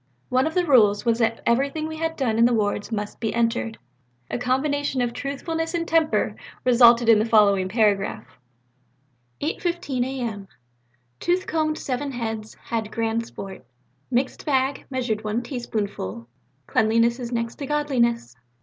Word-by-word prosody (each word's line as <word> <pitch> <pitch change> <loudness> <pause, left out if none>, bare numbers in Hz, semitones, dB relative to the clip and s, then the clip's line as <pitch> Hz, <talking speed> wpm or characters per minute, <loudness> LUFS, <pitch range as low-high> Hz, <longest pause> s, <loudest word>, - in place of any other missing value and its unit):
One 255 +3 +2
of 320 - -5
the 360 -1 +2
rules 215 -7 +4
was 230 0 +2
that 230 0 +1
everything 275 +6 +1
we 315 0 -6
had 325 0 -2
done 230 -6 0
in 230 - +6
the 240 0 +3
wards 205 0 -1
must 210 -1 -4
be 225 -1 -2
entered. 230 -1 0 0.5
A - - -2
combination 270 +2 0
of 240 -1 0
truthfulness 325 +5 -3
and 335 0 -1
temper 320 -1 +2 0.3
resulted 240 -1 +6
in 225 -2 +7
the 215 - +2
following 200 -4 +4
paragraph: 200 - +1 1.2
'8.15 330 -4 -1
A.M. 235 -6 -4 0.7
Tooth 360 +2 0
combed 310 -1 0
seven 275 +1 -3
heads, 225 -2 -4
had 220 -2 -3
grand 230 0 -1
sport; 190 - -9 0.5
mixed 260 +1 -1
bag, 270 -1 0
measured 245 -5 -2
one 215 +3 -1
teaspoonful; 205 - -4 0.4
cleanliness 230 - +2
is 240 -1 -5
next 230 -1 -2
to 280 - -4
godliness!' 240 - 0
235 Hz, 150 wpm, -24 LUFS, 220-280 Hz, 1.2 s, in